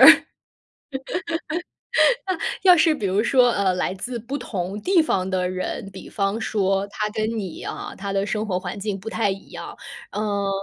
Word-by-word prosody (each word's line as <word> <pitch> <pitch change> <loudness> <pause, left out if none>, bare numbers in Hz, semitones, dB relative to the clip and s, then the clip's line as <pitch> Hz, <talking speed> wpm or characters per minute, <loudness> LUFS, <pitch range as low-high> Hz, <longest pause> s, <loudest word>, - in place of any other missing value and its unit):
那， - - +11 2.6
要 365 -2 +8
是 320 0 +5
比 215 - -3
如 195 +3 +2
说， 250 0 +5
呃， 195 -4 +2
来 180 0 0
自 240 +6 -4
不 235 +5 -4
同 195 -4 -3
地 365 - +4
方 190 -11 0
的 185 -1 0
人， 185 +1 -3
比 190 -1 -10
方 200 +1 0
说 195 -3 +1
他 210 +1 -2
跟 220 +1 -1
你 190 -5 -5
啊， - - -5
他 200 0 -3
的 195 0 +1
生 215 +1 -1
活 180 -3 0
环 185 +2 -5
境 200 -1 -2
不 215 +4 -6
太 220 -2 +1
一 195 0 -5
样。 - - -7 0.4
呃， 205 -1 0
200 Hz, 185 characters per minute, -24 LUFS, 190-225 Hz, 2.6 s, 那